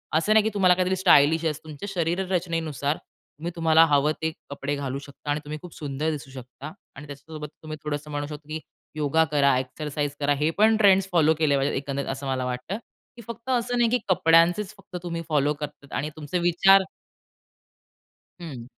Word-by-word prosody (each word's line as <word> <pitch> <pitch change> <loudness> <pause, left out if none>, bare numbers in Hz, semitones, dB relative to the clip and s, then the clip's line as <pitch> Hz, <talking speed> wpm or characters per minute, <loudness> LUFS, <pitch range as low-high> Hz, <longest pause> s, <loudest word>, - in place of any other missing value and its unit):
असं 185 +7 +3
नाही, 220 -1 +5
की 220 - +1
तुम्हाला 185 -3 +5
काहीतरी 185 +1 +1
स्टाइलिश 165 -3 +4
असं. 155 -1 -2
तुमच्या 155 +5 -8
शरीर 175 +2 0
रचनेनुसार 160 -5 -1
तुम्ही 165 +4 -10
तुम्हाला 165 -1 +5
हवं 145 0 +3
ते 160 0 0 0.2
कपडे 140 0 -3
घालू 140 -1 -4
शकता 145 +1 -11
आणि 150 - 0
तुम्ही 155 +1 -5
खूप 180 - -11
सुंदर 150 +1 -3
दिसू 135 -3 -7
शकता. 130 +3 -9 0.2
आणि 145 +2 -10
त्याच्यासोबत 150 +2 -8 0.2
तुम्ही 155 0 -6
थोडंस 150 0 -4
म्हणू 145 -1 -4
शकता, 150 -1 -9
की 155 +1 -3 0.4
योगा 155 +2 +2
करा, 140 -3 +4
एक्सरसाइज 145 +2 -4
करा. 145 0 +2
हे 150 +3 0
पण 220 +1 +5
ट्रेंड्स 195 -2 +5
फॉलो 160 -3 +4
केले 150 -3 +3
पाहिजेत. 135 +1 0
एकंदरीत 140 0 -3
असं 135 +1 -4
मला 130 -1 -1
वाटतं, 125 +11 -4 0.4
की 235 - -11
फक्त 235 +2 -8
असं 245 -1 0
नाही 235 -1 +3
की 250 - +3
कपड्यांचेच 175 +3 +4
फक्त 195 -2 -14
तुम्ही 170 -1 -4
फॉलो 150 -1 +2
करतात 145 -2 -9
आणि 150 +2 -2
तुमचे 155 +4 -3
विचार 185 +3 +5 1.6
हं. 140 -9 -7
155 Hz, 185 wpm, -25 LUFS, 145-175 Hz, 1.6 s, नाही